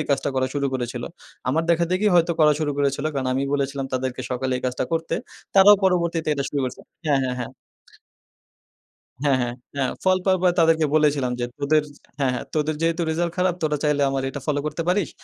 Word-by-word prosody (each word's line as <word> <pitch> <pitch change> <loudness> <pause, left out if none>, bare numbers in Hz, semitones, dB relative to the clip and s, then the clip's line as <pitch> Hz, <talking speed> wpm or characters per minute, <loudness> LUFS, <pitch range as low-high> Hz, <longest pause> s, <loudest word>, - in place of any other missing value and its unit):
এই 155 - -3
কাজটা 140 - +1
করা 130 0 +1
শুরু 140 -1 0
করেছিল। 120 -1 -3 0.5
আমার 160 +5 +2
দেখাদেখি 175 +5 +1
হয়তো 170 0 +4
করা 150 -1 +6
শুরু 145 -1 0
করেছিল। 140 +1 0
কারণ 130 -1 -1
আমি 135 - 0
বলেছিলাম 140 -1 -2
তাদেরকে 130 0 -2
সকালে 130 +1 -1
এই - - -10
কাজটা 125 - -1
করতে। 165 0 -1 0.4
তারাও 200 +1 +8
পরবর্তীতে 170 -3 +1
এটা 140 - -2
শুরু 145 - -2
করেছে। 125 - -5 0.3
হ্যাঁ, 140 -2 +3
হ্যাঁ, 125 -1 -1
হ্যাঁ। 125 - -4 1.7
হ্যাঁ, 140 -3 +3
হ্যাঁ। 120 0 -2 0.2
হ্যাঁ। 135 -2 0
ফল 185 0 +4
পাওয়ার 190 -1 +3
পরে 180 -1 +4
তাদেরকে 160 -1 +4
বলেছিলাম 145 -4 +2
যে, 120 - -1 0.8
হ্যাঁ, 135 -2 +2
হ্যাঁ, 125 - -3
তোদের 155 0 0
যেহেতু 165 +1 +1
রিজাল্ট 170 +1 -1
খারাপ, 180 0 +2
তোরা 150 -2 +1
চাইলে 150 -1 +2
আমার 135 -1 -1
এটা 145 - -6
ফলো 145 -1 +1
করতে 150 +2 -3
পারিস। 180 -4 +1
150 Hz, 195 wpm, -23 LUFS, 135-165 Hz, 1.7 s, তারাও